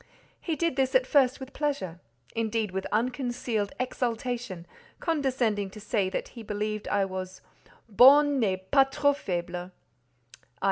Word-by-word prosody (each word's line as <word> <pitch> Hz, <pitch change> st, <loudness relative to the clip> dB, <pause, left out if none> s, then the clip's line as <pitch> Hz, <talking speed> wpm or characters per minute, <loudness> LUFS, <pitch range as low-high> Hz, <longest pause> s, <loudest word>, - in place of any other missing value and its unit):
He 330 Hz, -, -2 dB
did 335 Hz, -4 st, -1 dB
this 265 Hz, 0 st, +1 dB
at 260 Hz, 0 st, +5 dB
first 265 Hz, -2 st, +3 dB
with 265 Hz, 0 st, -9 dB
pleasure, 275 Hz, -, -2 dB, 0.4 s
indeed 220 Hz, -2 st, -1 dB
with 190 Hz, +1 st, -3 dB
unconcealed 240 Hz, -2 st, -1 dB
exultation, 245 Hz, -6 st, -3 dB, 0.3 s
condescending 255 Hz, -, 0 dB
to 215 Hz, -, -11 dB
say 205 Hz, -2 st, 0 dB
that 190 Hz, -, -4 dB
he 235 Hz, -, -10 dB
believed 215 Hz, 0 st, -3 dB
I 200 Hz, -1 st, +2 dB
was 185 Hz, -1 st, -6 dB, 0.5 s
"bonne 270 Hz, +5 st, +6 dB
et 190 Hz, -2 st, -2 dB
pas 270 Hz, -1 st, +6 dB
trop 285 Hz, +1 st, +2 dB
faible" 175 Hz, -8 st, -3 dB
(i. 180 Hz, +1 st, -6 dB
230 Hz, 140 wpm, -28 LUFS, 195-265 Hz, 0.5 s, bonne